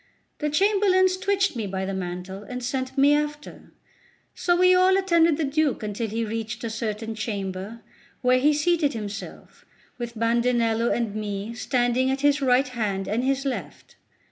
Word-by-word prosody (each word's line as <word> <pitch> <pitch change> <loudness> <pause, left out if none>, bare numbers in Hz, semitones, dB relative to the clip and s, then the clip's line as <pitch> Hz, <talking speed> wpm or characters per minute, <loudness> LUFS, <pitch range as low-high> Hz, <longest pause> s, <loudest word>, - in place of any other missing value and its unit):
The 300 - -1
chamberlains 375 +2 +3
twitched 390 -2 0
me 220 -4 -3
by 190 0 -3
the 195 - -3
mantle, 185 +1 -5
and 250 +4 -7
sent 260 +2 -3
me 280 +2 +5
after; 295 0 -3 0.6
so 350 - +1
we 365 +1 +5
all 370 +1 +5
attended 335 -5 +3
the 320 - -1
Duke 290 -3 0
until 210 +2 -3
he 225 +2 -2
reached 225 +2 -5
a 230 - -3
certain 220 0 -4
chamber, 205 0 -5 0.4
where 250 0 +4
he 295 +4 +4
seated 300 0 +1
himself, 210 -3 -8 0.4
with 235 -1 -6
Bandinello 230 0 +1
and 230 -4 -1
me 210 +1 -4
standing 245 +1 +1
at 270 +1 -1
his 290 0 +3
right 255 0 +3
hand 205 -6 -2
and 225 +4 -1
his 270 +1 0
left. 200 - -5
245 Hz, 165 wpm, -24 LUFS, 215-295 Hz, 0.6 s, me